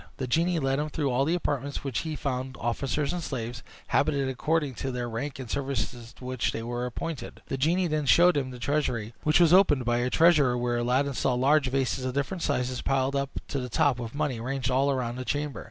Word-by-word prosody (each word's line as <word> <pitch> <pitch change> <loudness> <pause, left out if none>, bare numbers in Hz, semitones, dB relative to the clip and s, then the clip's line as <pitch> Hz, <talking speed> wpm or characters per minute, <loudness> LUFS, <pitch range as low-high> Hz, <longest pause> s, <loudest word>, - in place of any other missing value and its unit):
The 130 - -2
genie 170 +7 +1
led 135 -2 0
him 150 +1 -2
through 145 -3 -1
all 130 +3 +2
the 165 +4 +1
apartments, 140 -4 -2
where 135 -2 -4
he 160 -2 -2
found 130 -2 -3
officers 135 +5 -1
and 175 - -3
slaves, 120 -6 -4 0.3
habited 140 -2 +2
according 150 +2 0
to 135 - -2
their 125 -1 -3
rank 120 +5 -4
and 130 -2 -7
the - - -7
services 130 -3 -3
to 125 - -12
which 130 -1 -1
they 115 - -4
were 120 +1 -3
appointed. 160 +5 -6
The 135 - -1
genie 170 +6 +2
then 155 -3 -1
showed 175 +6 +6
him 135 -3 -1
the 125 - -8
treasury, 120 -4 -1
which 155 +2 +3
was 170 -1 +5
opened 150 -9 +5
by 120 0 +2
a 125 +1 0
treasurer, 150 -6 +4
where 120 0 0
Aladdin 130 +4 +1
saw 125 0 +1
large 135 +3 +3
vases 130 -1 0
of 130 0 -3
different 155 +6 -2
sizes, 125 -3 -1
piled 135 0 0
up 140 -1 0 0.2
to 140 - -2
the 125 -1 -4
top 125 +2 +2
with 120 +1 -6
money, 145 -5 -1
ranged 130 +1 -2
all 135 +2 +3
round 125 -2 -2
the - - -3
chamber. 145 +1 -2
135 Hz, 230 wpm, -27 LUFS, 125-150 Hz, 0.3 s, showed